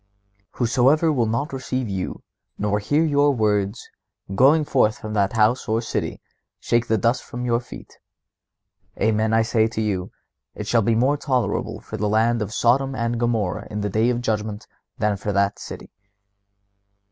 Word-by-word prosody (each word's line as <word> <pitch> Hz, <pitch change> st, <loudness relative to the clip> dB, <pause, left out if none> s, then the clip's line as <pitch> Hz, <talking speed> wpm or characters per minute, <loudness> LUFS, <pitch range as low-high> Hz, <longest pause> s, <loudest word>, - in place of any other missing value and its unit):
"Whosoever 135 Hz, +6 st, +3 dB
will 120 Hz, -5 st, +1 dB
not 125 Hz, +7 st, -2 dB
receive 130 Hz, -1 st, -3 dB
you, 95 Hz, -2 st, -4 dB, 0.3 s
nor 105 Hz, 0 st, 0 dB
hear 145 Hz, +9 st, +1 dB
your 145 Hz, -2 st, +3 dB
words, 105 Hz, -2 st, 0 dB, 0.5 s
going 145 Hz, +8 st, +4 dB
forth 110 Hz, -7 st, +2 dB
from 110 Hz, 0 st, -7 dB
that 100 Hz, -2 st, +1 dB
house 110 Hz, +3 st, +2 dB
or 110 Hz, +1 st, +2 dB
city, 115 Hz, -, -3 dB, 0.4 s
shake 120 Hz, 0 st, 0 dB
the 110 Hz, -, +2 dB
dust 115 Hz, +5 st, +1 dB
from 125 Hz, 0 st, -6 dB
your 120 Hz, -1 st, +2 dB
feet. 125 Hz, -, -12 dB, 1.0 s
Amen, 110 Hz, 0 st, +1 dB
I 115 Hz, 0 st, +4 dB
say 110 Hz, -1 st, +2 dB
to 110 Hz, -, -5 dB
you, 100 Hz, -4 st, -1 dB, 0.5 s
it -, -, -5 dB
shall 115 Hz, -, +2 dB
be 115 Hz, +2 st, +2 dB
more 130 Hz, +6 st, +2 dB
tolerable 130 Hz, -4 st, -1 dB
for 110 Hz, -, -7 dB
the 105 Hz, 0 st, -1 dB
land 115 Hz, +2 st, +2 dB
of 105 Hz, -1 st, -3 dB
Sodom 130 Hz, +4 st, +2 dB
and 115 Hz, -1 st, -1 dB
Gomorrha 110 Hz, -5 st, -1 dB
in 105 Hz, 0 st, -4 dB
the 105 Hz, -1 st, -2 dB
day 110 Hz, +4 st, +2 dB
of 120 Hz, -1 st, 0 dB
judgment 105 Hz, -2 st, -2 dB, 0.3 s
than 105 Hz, -1 st, 0 dB
for 105 Hz, +1 st, -3 dB
that 100 Hz, +1 st, +1 dB
city." -, -, -9 dB
115 Hz, 170 wpm, -22 LUFS, 105-125 Hz, 1.0 s, going